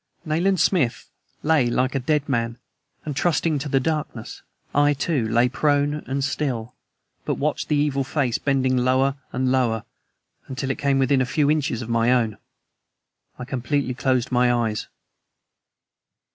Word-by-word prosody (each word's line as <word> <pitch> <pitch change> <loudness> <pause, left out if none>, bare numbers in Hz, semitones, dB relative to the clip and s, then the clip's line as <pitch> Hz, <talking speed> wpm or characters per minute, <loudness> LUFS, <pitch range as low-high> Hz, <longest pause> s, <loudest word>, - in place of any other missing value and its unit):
Nayland 175 +4 +1
Smith 140 -12 +1 0.3
lay 150 -5 +3
like 125 +2 0
a 135 - 0
dead 145 +2 0
man, 115 -3 -1 0.5
and 150 -3 -4
trusting 160 0 +1
to 145 +2 -4
the 135 - +3
darkness, 150 -5 -3 0.3
I, 145 0 +3
too, 140 -5 0
lay 120 +2 +3
prone 145 +2 +1
and 135 +1 -1
still, 130 -4 -2 0.5
but - - -1
watched - - -2
the 150 - +1
evil 145 -2 +1
face 135 -3 -1
bending 130 -2 +1
lower 130 +2 +2
and 130 0 0
lower, 115 -4 +1 0.6
until 135 +1 -3
it 135 - -5
came 140 -2 +2
within 135 0 +3
a - - +2
few 145 +2 +2
inches 140 -6 -1
of - - -8
my 115 +1 +2
own. 115 -4 +1 1.0
I 125 - -6
completely 130 +1 -1
closed 130 -1 0
my 125 0 +3
eyes. 115 -3 -1
135 Hz, 155 wpm, -23 LUFS, 125-145 Hz, 1.0 s, lay